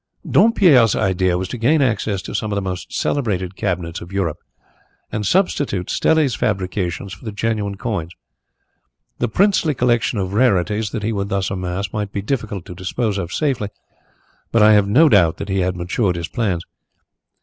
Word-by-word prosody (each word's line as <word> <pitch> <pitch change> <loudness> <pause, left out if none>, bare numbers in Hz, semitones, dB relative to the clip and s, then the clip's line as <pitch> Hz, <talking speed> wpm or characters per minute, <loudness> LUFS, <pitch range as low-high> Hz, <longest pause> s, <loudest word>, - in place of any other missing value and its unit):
"Dompierre's 160 - +5
idea 95 -1 +1
was 95 +1 -3
to 125 - -5
gain 150 +8 +3
access 110 -7 0
to - - -7
some 110 - -2
of - - -1
the 100 - 0
most 90 -1 -5
celebrated 95 -9 -1
cabinets 85 -4 -3
of 85 - -10
Europe 95 -6 -2 0.7
and 105 -2 -2
substitute 145 - 0
Stelli's 155 -5 +2
fabrications 95 -2 -2
for - - -13
the 110 - -4
genuine 105 -1 -2
coins. 95 -7 -3 1.1
The 120 - +1
princely 175 - +2
collection 120 -2 +1
of 95 -1 -2
rarities 105 -2 +2
that 105 +1 -4
he 110 +2 -1
would 100 -1 -2
thus 100 -2 -1
amass 95 +1 -3
might 105 -2 -3
be 100 - -4
difficult 105 -6 -3
to - - -8
dispose 100 +3 -2
of 85 -2 -4
safely, 130 - -1 0.8
but 115 -2 +4
I 110 0 +7
have 105 -1 +4
no 145 +11 +5
doubt 90 - +4
that 100 - -6
he 95 0 0
had 90 0 0
matured 90 +2 -1
his 85 -1 -4
plans. 95 -7 -1
100 Hz, 175 wpm, -20 LUFS, 95-115 Hz, 1.1 s, I